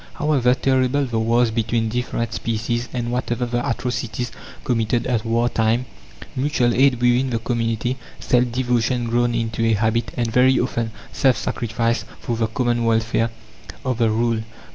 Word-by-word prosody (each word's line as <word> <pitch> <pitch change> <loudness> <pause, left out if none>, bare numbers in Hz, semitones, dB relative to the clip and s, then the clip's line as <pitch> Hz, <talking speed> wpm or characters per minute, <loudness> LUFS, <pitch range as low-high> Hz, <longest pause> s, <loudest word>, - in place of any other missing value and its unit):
However 135 -5 +2
terrible 130 +1 +1
the 120 -3 -1
wars 115 +1 +2
between 115 0 0
different 115 -1 -2
species, 120 +2 -2
and 120 -1 -3
whatever 125 0 -1
the 120 0 -1
atrocities 120 0 -3 0.3
committed 115 -1 0
at 120 -4 0
war 115 +1 +1
time, 115 +1 +1 0.5
mutual 130 -3 +1
aid 130 -1 +4
within 125 +2 +3
the 120 - 0
community, 115 +1 -1 0.2
self 125 -1 +2
devotion 125 0 0
grown 120 0 +1
into 115 0 -1
a 115 0 +3
habit, 110 +2 +1
and 120 -2 0
very 130 +1 +5
often 115 -2 -1 0.2
self 130 -4 +3
sacrifice 115 +1 -1 0.2
for 120 - -3
the 115 -1 0
common 120 +1 0
welfare, 115 0 +1 0.6
are 130 - +1
the 115 -1 +1
rule. 115 +1 +1
120 Hz, 155 wpm, -21 LUFS, 115-125 Hz, 0.6 s, very